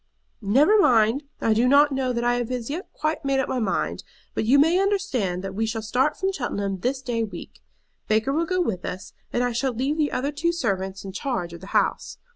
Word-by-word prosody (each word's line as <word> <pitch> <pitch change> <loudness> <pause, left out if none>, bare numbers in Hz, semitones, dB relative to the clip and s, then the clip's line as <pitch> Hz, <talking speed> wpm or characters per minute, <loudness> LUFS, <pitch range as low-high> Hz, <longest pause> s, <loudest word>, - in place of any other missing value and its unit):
"Never 280 - +4
mind. 235 - +3 0.2
I 225 - +3
do 235 +3 +3
not 285 +2 +5
know 265 -1 0
that 235 -1 -2
I 240 0 +2
have 240 -1 -2
as 250 0 -3
yet 345 +7 -5
quite 310 +1 -2
made 275 -1 +1
up 265 - 0
my 255 - -1
mind. 215 -5 -1 0.3
But - - -1
you 260 +6 +5
may 325 +6 +4
understand 275 - 0
that 195 -1 -5
we 220 +3 -1
shall 220 0 -3
start 250 +7 +1
from 385 0 0
Cheltenham 200 - -3
this 260 +6 -2
day 235 -3 -1
week. 215 - -8 0.5
Baker 220 +5 +1
will 330 +3 0
go 365 +1 +1
with 195 - -2
us, 185 - -6 0.2
and 245 - 0
I 245 - 0
shall 255 +2 -1
leave 270 +6 -1
the 295 -1 +1
other 275 +3 -1
two 335 +4 0
servants 195 - -2
in 195 - -5
charge 190 -5 -3
of 170 - -10
the 190 - -10
house. - - -1
250 Hz, 230 wpm, -24 LUFS, 215-290 Hz, 0.5 s, not